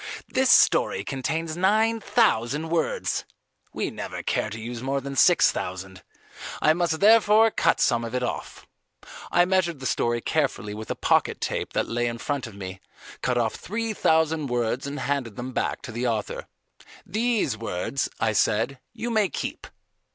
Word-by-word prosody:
"This 265 0 +1
story - - +4
contains 155 +4 -3
nine 215 +5 +2
thousand 155 - +1
words. 165 -1 -1 0.5
We - - -3
never - - -6
care - - -1
to 115 - -7
use 115 +1 -6
more 135 +2 -1
than 140 0 -6
six - - +5
thousand. 95 0 -6 0.6
I 155 - +4
must 165 -1 -1
therefore 220 +1 +6
cut - - +2
some 120 -1 +2
of 115 +2 -5
it 125 - -1
off." 125 - -5 0.7
I 175 - +5
measured 180 -4 +1
the 130 - -8
story 120 -1 0
carefully 135 -7 -1
with 110 +1 -8
a - - -1
pocket - - +1
tape - - -3
that - - 0
lay 120 +1 -1
in 115 0 -3
front 140 +1 -3
of 110 - -12
me, 95 -1 -7 0.4
cut 125 -1 0
off 115 -2 +1
three 225 +3 -3
thousand 160 -5 +2
words 120 +2 -1
and 140 -1 -5
handed 125 -5 -2
them 125 +3 -5
back - - -2
to - - -7
the 120 +2 -2
author. 110 -3 -3 0.6
"These 220 - 0
words," 115 +4 -2
I 110 -1 +1
said, 115 +6 +1
"you 235 +1 -4
may 215 -4 +2
keep. - - -5
135 Hz, 170 wpm, -25 LUFS, 115-175 Hz, 0.7 s, therefore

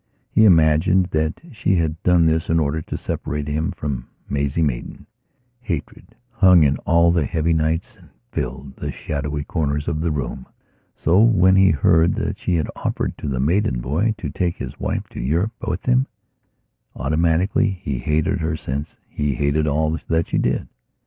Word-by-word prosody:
He 110 - +5
imagined 85 +1 +4
that 80 +1 -1
she 105 -5 0
had 80 -1 -1
done 90 -2 +4
this 80 0 +1
in 80 0 +3
order 80 +1 0
to - - -5
separate 75 +1 -4
him 75 +2 -1
from 70 -4 -4 0.2
Maisie 70 +3 0
Maidan. 65 -6 -3 0.5
Hatred 110 - -6 0.2
hung 90 -4 +6
in 70 -1 +2
all 85 +1 +5
the 85 -4 +1
heavy 85 -1 0
nights 80 +9 -1
and 85 -5 -20 0.2
filled 65 -1 -5
the - - -4
shadowy 75 0 -4
corners 75 -2 -2
of 80 -2 -1
the 85 - 0
room. 65 -4 -4 0.5
So 90 +6 +3
when 95 -5 +5
he 95 0 +6
heard 80 +2 +3
that - - -3
she 90 - 0
had 80 -3 -1
offered - - -2
to - - -5
the 65 -2 -2
Maidan 75 - +1
boy 80 - 0
to 110 - -5
take 90 -2 -1
his - - -7
wife - - -2
to - - -9
Europe 85 - 0
with - - -3
him, 65 +2 +3 0.9
automatically 80 - +1
he 80 -9 -4
hated 80 +7 0
her 80 -1 -1
since 70 +2 -5
he 75 -2 -2
hated 75 +3 +1
all 80 +2 0
that 80 0 +1
she - - +1
did. - - 0
80 Hz, 175 wpm, -21 LUFS, 75-90 Hz, 0.9 s, hung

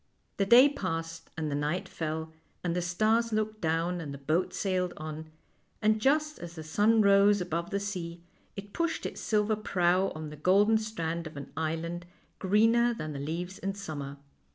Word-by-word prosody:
The 195 - +1
day 245 +6 +9
passed 165 - -4
and 155 -2 -2
the - - -1
night 150 +5 -1
fell, 160 0 -4 0.3
and 175 -1 -1
the 180 - 0
stars 215 +6 +1
looked 215 0 -1
down, 165 +2 0
and 145 -3 -6
the 140 - -6
boat 155 +6 0
sailed 185 -2 -1
on, 155 0 -6 0.5
and 215 0 +2
just 300 +4 +2
as 170 -1 -8
the 160 - -7
sun 210 +8 +3
rose 200 +1 +5
above 170 -1 -2
the 200 -1 -1
sea 175 -4 -5 0.3
it 200 0 -9
pushed 335 -1 -1
its - - -5
silver 215 0 +1
prow 185 -2 +2
on 155 -1 -6
the - - -8
golden 200 +7 +4
strand 170 -7 -3
of 155 - -10
an 140 - -8
island 165 +3 -3 0.3
greener 225 +5 +3
than 155 -7 -5
the 140 - -5
leaves 170 +6 -4
in 195 +1 -3
summer. 145 -8 -6
180 Hz, 180 wpm, -29 LUFS, 160-210 Hz, 0.5 s, day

